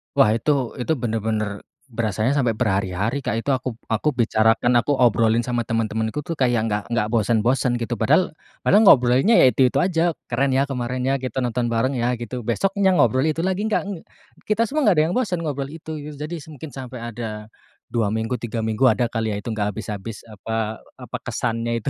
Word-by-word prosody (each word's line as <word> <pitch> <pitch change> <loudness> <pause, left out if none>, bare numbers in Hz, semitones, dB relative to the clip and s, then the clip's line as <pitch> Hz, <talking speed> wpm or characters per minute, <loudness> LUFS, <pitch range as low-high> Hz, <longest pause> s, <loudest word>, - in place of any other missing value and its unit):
Wah 105 - +5
itu 135 -2 -1
itu 130 +6 0
bener-bener 110 -4 -2 0.2
berasanya 115 +4 0
sampai 125 -4 +2
berhari-hari 100 +1 -1
Kak - - 0
itu, 115 - -3
aku 130 -2 0 0.2
aku 115 +7 +1
bicarakan, 115 +1 +3
aku 145 +4 +2
obrolin 115 -2 +3
sama 120 -2 -1
teman-temanku 110 +3 -1
tuh 165 - -4
kayak 120 -4 +1
nggak 105 -1 -1
nggak 105 -2 +1
bosen-bosen 120 +3 +2
gitu, 120 0 -2
padahal 160 +6 +3 0.3
padahal 210 +3 +5
ngobrolnya 130 - +5
ya - - +7
itu-itu 130 -1 +2
aja, 170 -2 +1 0.2
"Keren 135 -1 +1
ya, 135 +1 +3
kemarin 125 -1 -3
ya, 135 +1 +2
kita 130 0 -6
nonton 120 0 -1
bareng 125 +4 0
ya," 120 +1 +1
gitu. 120 0 -6
Besoknya 195 - +1
ngobrol 130 -2 +3
itu 160 +2 -1
lagi 190 +3 -1
gak, 220 - 0
ng 185 -5 -7 0.4
kita 220 +2 +2
semua 300 0 0
gak 195 - +5
ada - - +4
yang - - -2
bosen 185 -9 -1
ngobrol 140 -3 -3
itu, 160 0 -7
gitu. 150 +1 -8
Jadi 155 +4 -5
s - - -13
mungkin 155 +1 -9
sampai 130 -1 -7
ada 110 -2 -6 0.4
2 110 -4 +1
minggu, 110 +3 -1
3 115 -1 -3
minggu 110 +4 +1
ada 120 - +2
kali 115 -1 -2
ya 100 - -3
itu 115 - -6
gak 105 -2 -1
habis-habis, 105 0 -6
apa 110 +1 -4 0.2
apa - - -6
kesannya 115 0 -1
itu - - -2
120 Hz, 195 wpm, -22 LUFS, 110-140 Hz, 0.4 s, ya